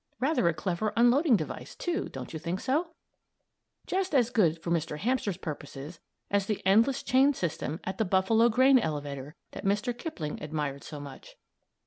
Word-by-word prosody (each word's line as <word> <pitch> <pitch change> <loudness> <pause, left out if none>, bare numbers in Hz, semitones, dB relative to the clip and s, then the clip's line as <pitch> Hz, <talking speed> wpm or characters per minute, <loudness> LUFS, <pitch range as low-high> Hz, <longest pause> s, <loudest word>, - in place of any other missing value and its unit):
Rather 270 - +2
a 170 - +3
clever 185 +5 -1
unloading 245 +4 +5
device, - - -6
too; 350 -1 -2
don't 130 +2 -8
you 160 - -4
think 175 +3 -3
so? 320 - -1 0.9
Just 380 -3 -1
as 245 -3 +3
good 170 -9 +3
for 170 - -4
Mr. 160 -3 -1
Hamster's 215 -2 -1
purposes 150 -1 -7 0.3
as 200 -1 +1
the 215 - -1
endless 225 +7 +4
chain 270 +2 +4
system 165 -3 -3
at 190 0 -5
the 220 - +2
Buffalo 200 +5 +3
grain 260 +3 +5
elevator 145 - -4 0.2
that - - -8
Mr. 210 +5 0
Kipling 190 - -5
admired 150 -2 -3
so 150 - -8
much. 140 -2 -11
195 Hz, 165 wpm, -29 LUFS, 155-250 Hz, 0.9 s, unloading